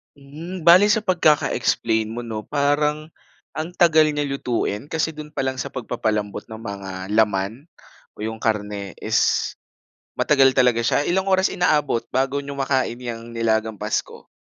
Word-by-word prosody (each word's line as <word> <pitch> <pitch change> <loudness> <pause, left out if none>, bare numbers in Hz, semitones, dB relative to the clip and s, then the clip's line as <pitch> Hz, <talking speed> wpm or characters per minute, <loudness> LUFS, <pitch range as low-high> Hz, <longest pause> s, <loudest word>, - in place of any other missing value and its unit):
Hmm. 155 +6 -9
Bale 180 +5 +7
sa 210 0 +2
pagkaka-explain 145 - +2
mo 115 +2 -5
'no, 110 -2 -6
parang, 150 +2 0 0.5
ang 160 +3 -4
tagal 160 -3 +5
niya 145 -1 -1
lutuin. 125 -5 -2
Kasi 160 0 -1
do'n 150 -1 -10
pa 135 - -2
lang 130 0 -2
sa - - -5
pagpapa-lambot 110 -4 -2
ng 110 -1 -9
mga 100 -3 -6 0.2
laman, 105 +3 +1 0.5
o - - -11
'yong 110 0 -4
karne 105 -3 -2
is, - - 0 1.0
matagal 135 -3 +4
talaga 125 -2 +4
siya. 145 +5 +1
Ilang 190 +2 0
oras 190 0 +2
inaabot 150 -9 +1
bago 135 +2 0
niyo 140 0 -7
makain 135 -3 0
'yang 115 -1 -7
nilagang 110 -1 0
Pasko? - - -3
130 Hz, 150 wpm, -22 LUFS, 110-150 Hz, 1.0 s, Bale